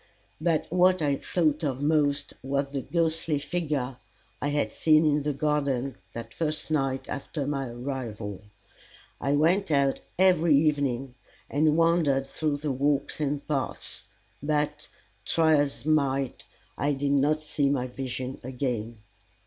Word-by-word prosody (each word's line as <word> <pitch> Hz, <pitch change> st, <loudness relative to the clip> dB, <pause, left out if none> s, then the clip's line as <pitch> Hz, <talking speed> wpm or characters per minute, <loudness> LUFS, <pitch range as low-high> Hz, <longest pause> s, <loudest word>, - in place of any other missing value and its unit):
But 165 Hz, -2 st, +1 dB
what 185 Hz, +1 st, +4 dB
I 145 Hz, -3 st, +1 dB
thought 155 Hz, -2 st, 0 dB
of 140 Hz, -2 st, -1 dB
most 145 Hz, -2 st, +2 dB
was 140 Hz, +1 st, -1 dB
the 140 Hz, -1 st, -2 dB
ghostly 165 Hz, -1 st, 0 dB
figure 140 Hz, -4 st, -2 dB, 0.4 s
I 145 Hz, -, 0 dB
had 145 Hz, 0 st, 0 dB
seen 155 Hz, 0 st, +4 dB
in 150 Hz, -1 st, +3 dB
the 150 Hz, +1 st, 0 dB
garden 140 Hz, -3 st, 0 dB, 0.2 s
that 115 Hz, -1 st, -7 dB
first 155 Hz, -1 st, -2 dB
night 135 Hz, -3 st, 0 dB
after 145 Hz, +1 st, -4 dB
my 135 Hz, -2 st, -2 dB
arrival. 120 Hz, -6 st, -5 dB, 0.8 s
I 140 Hz, -, +1 dB
went 175 Hz, +7 st, +3 dB
out 140 Hz, -2 st, +2 dB, 0.2 s
every 175 Hz, -4 st, +5 dB
evening 140 Hz, -4 st, +1 dB, 0.4 s
and 150 Hz, +2 st, +3 dB
wandered 165 Hz, -5 st, +3 dB
through 145 Hz, +1 st, -2 dB
the 145 Hz, 0 st, -2 dB
walks 140 Hz, +3 st, 0 dB
and 145 Hz, -1 st, -2 dB
paths; 140 Hz, -3 st, -2 dB, 0.4 s
but, 150 Hz, 0 st, -1 dB, 0.4 s
try 160 Hz, +4 st, +3 dB
as 145 Hz, -1 st, -1 dB
I -, -, 0 dB
might, 135 Hz, -3 st, 0 dB, 0.3 s
I 145 Hz, +1 st, +2 dB
did 140 Hz, +1 st, -1 dB
not 145 Hz, +2 st, +2 dB
see 145 Hz, -2 st, +1 dB
my 135 Hz, -3 st, 0 dB
vision 130 Hz, 0 st, -5 dB
again. 120 Hz, -4 st, -3 dB
145 Hz, 140 wpm, -27 LUFS, 135-155 Hz, 0.8 s, every